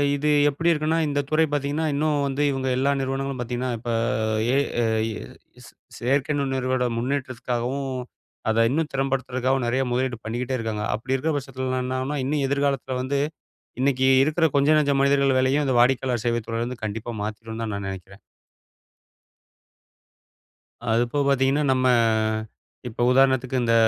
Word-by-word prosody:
இது 150 +2 0 0.2
எப்படி 165 +4 0
இருக்குன்னா 155 +1 +1
இந்த 145 0 -1
துறை 160 +1 +3
பார்த்தீங்கன்னா 145 +2 -1
இன்னும் 145 0 +1
வந்து 140 +1 -2
இவுங்க 135 -1 -2
எல்லா 140 +2 +2
நிறுவனங்களும் 135 0 -2
பார்த்தீங்கன்னா, 125 +1 -3
இப்ப 120 +1 -5 0.6
ஏ. - - +4 0.5
ஐ. - - -2 0.6
ஸ் - - -13
ஸ் - - -15 0.3
செயற்கை 135 +4 0
நுண்ணறிவோட 130 -2 0
முன்னேற்றத்துக்காகவும், 130 0 -2 0.6
அத 115 +1 +3
இன்னும் 155 +3 0
திறம்படுத்துறதுக்காகவும், 130 -1 0
நெறைய 130 +3 +1
முதலீடு 125 -1 -1
பண்ணிக்கிட்டே 125 +3 -2
இருக்காங்க. 110 -3 -3
அப்படி 125 +5 -2
இருக்க 155 +4 -1
பட்சத்துலலாம் 130 -1 -3
என்னாகும்ன்னா, 130 +3 -2
இன்னும் 140 0 0
எதிர்காலத்தில 140 -2 -1
வந்து, 140 +2 -1 0.6
இன்னைக்கி 130 -1 +2 0.2
இருக்கிற 155 +2 +1
கொஞ்ச 140 +1 +3
நஞ்ச 145 -2 +2
மனிதர்கள் 140 -1 +3
வேலையும், 135 +3 +2
அந்த 130 - +1
வாடிக்கையாளர் 125 -2 +2
சேவைத் 120 -1 0
துறையிலேருந்து 115 +1 -4
கண்டிப்பா 115 +3 -5
மாத்திருந்தான் 110 +1 -5
நான் 100 -1 -4
நெனைக்கிறேன். 95 +1 -9 2.7
அதுபோக 120 +5 +1
பார்த்தீங்கன்னா, 135 +2 +2
நம்ம 130 0 +1 1.0
இப்ப 120 0 -3
உதாரணத்துக்கு 130 -1 +3
இந்த 115 -1 +2
130 Hz, 135 wpm, -24 LUFS, 120-140 Hz, 2.7 s, ஏ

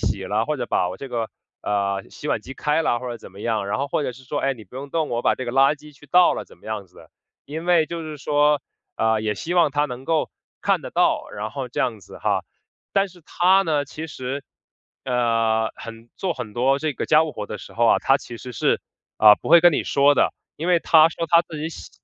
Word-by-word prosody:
洗 100 -2 -1
了， 110 +2 0
或 150 - -1
者 - - -3
把 90 - +1
我 90 - -6
这 135 - -8
个， 115 -3 -2 0.3
呃， 100 -1 0
洗 - - -9
碗 - - 0
机 135 - -10
开 150 +4 +1
了 120 - +1
或 125 +1 -6
者 120 - -4
怎 - - -12
么 95 - -15
样。” 110 -1 -1
然 105 - -1
后， 140 - -1
或 145 - -1
者 140 - -2
是 130 +2 -13
说： 145 +3 -3
“哎， 135 - +2
你 115 -5 -11
不 100 - -20
用 140 +2 -7
动， 160 -1 0
我 120 0 -1
把 - - +2
这 130 - -4
个 120 - -4
垃 135 +3 +4
圾 150 0 -15
去 145 +2 -18
倒 180 0 +6
了 - - -5
怎 - - -19
么 - - -17
样 110 -3 -4
子。” 90 - -17 0.4
因 160 +4 -6
为 170 -3 +4
就 170 0 -5
是 155 -1 -6
说， 145 0 +2 0.4
呃， 110 -1 +1
也 105 -1 -1
希 170 - -3
望 170 -4 +4
她 145 +1 +1
能 125 -2 -6
够 160 +1 +1 0.3
看 - - +1
得 - - -7
到， - - +1
然 105 +1 -5
后 135 -3 -4
这 - - -7
样 115 -4 0
子 95 - -13
哈。 - - 0 0.5
但 195 0 +3
是 180 -1 -17
她 185 +5 +3
呢？ 150 -5 0
其 155 +3 -7
实， 135 -1 -5 0.6
呃， 115 -3 +1
很 115 0 -10
做 185 -2 -1
很 125 -8 -7
多 130 +4 +2
这 155 0 -1
个 - - -4
家 155 +1 +5
务 155 - -5
活 - - -5
的 105 +1 -7
时 - - -12
候 120 - +1
啊， - - +5
她 135 - +3
其 120 -4 -9
实 125 +2 -9
是， - - +1 0.4
呃， 105 -1 +9
不 - - -5
会 170 - +8
跟 175 +1 +6
你 - - +1
说 140 +1 +4
的。 - - +2 0.2
因 165 +4 -4
为 175 - +5
她 160 -1 +6
说 165 0 -4
她 170 +1 +6
自 160 -2 -9
己 155 +2 -3
喜 - - -10
135 Hz, 280 characters per minute, -23 LUFS, 115-155 Hz, 0.6 s, 呃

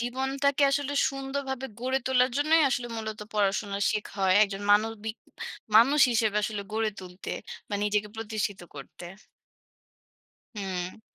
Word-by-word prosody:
জীবনটাকে 265 +3 0
আসলে 285 0 0 0.2
সুন্দরভাবে 270 -1 -4
গড়ে 260 +1 0
তোলার 255 -1 +3
জন্যই 310 +2 +4
আসলে 240 -1 -1
মূলত 220 -1 -5
পড়াশোনা 200 -1 0
শেখা 210 -1 -3
হয়। 185 0 +4
একজন 200 -1 -1
মানবিক 220 +1 +2 0.6
মানুষ 275 +7 +6
হিসেবে 220 -2 +1
আসলে 210 -2 -2
গড়ে 220 0 0
তুলতে। 180 0 -8 0.4
বা 205 - -3
নিজেকে 210 0 0
প্রতিষ্ঠিত 215 -3 -3
করতে। 145 +5 -10 1.5
হুম। 185 -1 -4
220 Hz, 125 wpm, -28 LUFS, 205-265 Hz, 1.5 s, মানুষ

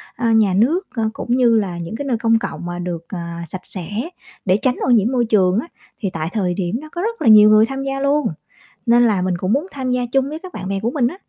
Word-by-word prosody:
a, 230 -1 0
nhà 215 -4 +3
nước, 310 - +2
a, 230 - -2
cũng 240 - -2
như 240 -3 +4
là 185 -4 -3
những 170 +4 -6
cái 285 - -5
nơi 255 -4 0
công 225 0 +2
cộng 175 - -5
mà 175 0 -5
được, 175 -2 -5
ờ, 185 - -5 0.3
sạch 180 +4 -6
sẽ 180 -4 -5 0.6
để 190 0 +3
tránh 255 -1 +2
ô - - 0
nhiễm 230 -1 +4
môi 245 -2 +1
trường 195 -3 +3
á 265 - -5 0.3
thì 200 - -1
tại 160 0 -3
thời 185 -5 0
điểm 185 +4 -2
đó 310 - -11
có 345 - -4
rất 460 +3 -3
là - - 0
nhiều 215 -1 +8
người 215 +1 +6
tham 270 +3 -5
gia 275 0 -3
luôn, 280 +1 +1 0.6
nên 240 +1 +5
là 210 -6 +2
mình 180 -1 -1
cũng 185 +3 -1
muốn 285 +8 +1
tham 265 -2 -4
gia 250 0 +1
chung 270 0 +2
với 305 +2 -5
các 365 +2 -11
bạn 190 - -6
bè 195 0 -2
của 225 +3 -1
mình 255 -3 +1
á. 315 - -8
225 Hz, 275 wpm, -19 LUFS, 190-265 Hz, 0.6 s, nhiều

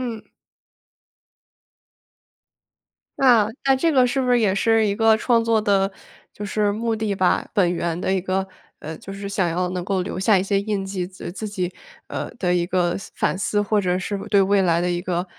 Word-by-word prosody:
嗯。 230 -4 -5 2.9
那 235 -6 +5 0.2
那 270 -1 +4
这 325 +5 +1
个 255 -3 +4
是 270 +2 0
不 250 - 0
是 245 - +5
也 200 -4 +2
是 225 +2 +3
一 200 - 0
个 225 +1 +4
创 230 +1 +2
作 225 -1 +2
的 200 -2 +2 0.4
就 210 - -7
是 205 0 0
目 225 +1 -1
的 215 -2 -1
吧， 185 -2 +1
本 180 -5 +3
源 170 -1 -2
的 190 - 0
一 190 - +1
个， 190 +1 -1 0.3
呃， 155 +1 -7
就 195 - -9
是 200 0 -6
想 190 -3 0
要 180 +2 -1
能 180 -1 -4
够 190 -1 -1
留 180 - -5
下 195 +2 +4
一 185 - +2
些 195 0 0
印 200 -2 -2
记， 190 -2 -3
自 185 0 -12
呃， - - -4
自 205 +4 -6
己， 185 -3 -3 0.4
呃 - - -4
的 180 -5 0
一 175 -1 +1
个 175 -1 0
思 - - -12
反 - - -1
思， 205 +1 0
或 210 +1 +1
者 180 -2 0
是 200 +2 -3
对 200 -2 +5
未 195 0 +3
来 170 -2 +2
的 180 0 0
一 175 0 -1
个 175 0 -2
195 Hz, 225 characters per minute, -22 LUFS, 185-220 Hz, 2.9 s, 那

